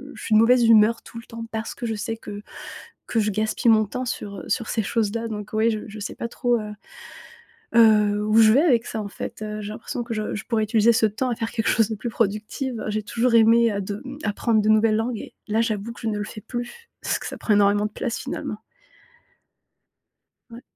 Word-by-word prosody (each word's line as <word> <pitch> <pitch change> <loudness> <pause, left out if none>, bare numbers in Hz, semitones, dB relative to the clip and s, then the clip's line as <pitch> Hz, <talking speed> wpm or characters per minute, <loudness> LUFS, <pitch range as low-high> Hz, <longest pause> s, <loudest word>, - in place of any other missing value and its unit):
je - - -10
suis 215 - +1
de - - +7
mauvaise 240 +1 +5
humeur 225 +1 +5
tout 230 - -12
le - - -12
temps 230 0 -8
parce 220 0 -4
que 240 - -6
je 225 - -2
sais 225 +2 -4
que 205 -2 -9 0.6
que 230 - 0
je 210 - 0
gaspille 215 +3 0
mon 215 -1 +4
temps 255 +5 -4
sur, 205 -4 -5
heu, 165 - -9
sur 230 -3 -1
ces 220 - 0
choses-là. 230 +2 -1
Donc 210 -1 -6
ouais, 220 +1 +3
je 215 - -3
je 215 0 -9
sais 200 - -5
pas 235 - -4
trop, 245 -1 0
heu 210 0 -6 1.1
heu, 210 -2 +5
où 215 - +2
je 220 -1 +7
vais 265 - +5
avec 245 -9 +3
ça 220 - -4
en 205 - -6
fait, 200 - -7
heu, 215 0 -4
j'ai 205 - -6
l'impression 230 +2 -5
que 235 - -6
je 215 -1 -3
je 210 - -5
pourrais 225 -3 0
utiliser 220 +1 +4
ce 220 -1 +3
temps 225 +5 -2
à 240 - 0
faire 225 0 -3
quelque 225 - -1
chose 225 -2 +3
de - - -1
plus 235 +3 -4
productive. 225 +4 -2
J'ai 215 0 -1
toujours 235 +4 0
aimé, 230 0 +5
heu, 200 - -2
de 200 +2 -5
mmh, 275 +2 -8
apprendre 220 +1 +1
de 215 - 0
nouvelles 215 0 +4
langues 230 +2 -1
et - - -9 0.2
là, 220 +2 +1
j'avoue 220 0 -2
que - - -13
je 225 - -1
ne 210 -1 -1
le 210 - -2
fais 215 0 -9
plus, 245 - -7
parce - - 0
que - - -7
ça - - -6
prend 210 - +1
énormément 205 +1 +3
de 210 - -8
place 240 +1 -3
finalement. 215 0 -5 1.9
Ouais. 235 +1 -11
220 Hz, 245 wpm, -23 LUFS, 210-230 Hz, 1.9 s, de